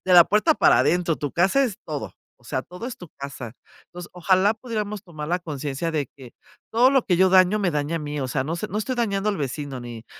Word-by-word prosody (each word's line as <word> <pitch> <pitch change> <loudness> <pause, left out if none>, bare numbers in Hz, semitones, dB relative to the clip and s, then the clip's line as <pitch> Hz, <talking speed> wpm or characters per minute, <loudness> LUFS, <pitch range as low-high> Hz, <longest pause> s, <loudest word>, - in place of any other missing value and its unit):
de 185 - +1
la 175 -2 +10
puerta 215 +10 +3
para - - +5
adentro, 175 -2 +1
tu 145 -2 -4
casa 190 +11 +3
es 220 -7 -3
todo, 150 -2 -5 0.2
o 120 - -27
sea, 130 +1 -2
todo 180 +7 -8
es 255 - -6
tu 180 - -11
casa. 140 -4 -7 0.3
Entonces, 175 0 -10
ojalá 185 +4 +3
pudiéramos 210 -3 -4
tomar 155 -4 -8
la 175 +2 +1
conciencia 150 0 -4
de 150 -3 -1
que, 130 -4 -12 0.4
todo 245 +3 +5
lo 270 -3 +3
que 180 - +3
yo 190 +2 +5
daño 185 +2 +5
me 185 -3 +1
daña 150 +3 -1
a - - -1
mí, 150 -1 -4
o 130 - -2
sea, 130 +1 -1
no 160 - -2
sé, 210 +5 -4
no 210 - -3
estoy 255 +4 -2
dañando 205 -3 0
al 200 - -3
vecino 140 -1 -4
ni 120 -2 -8
175 Hz, 245 wpm, -24 LUFS, 145-205 Hz, 0.4 s, la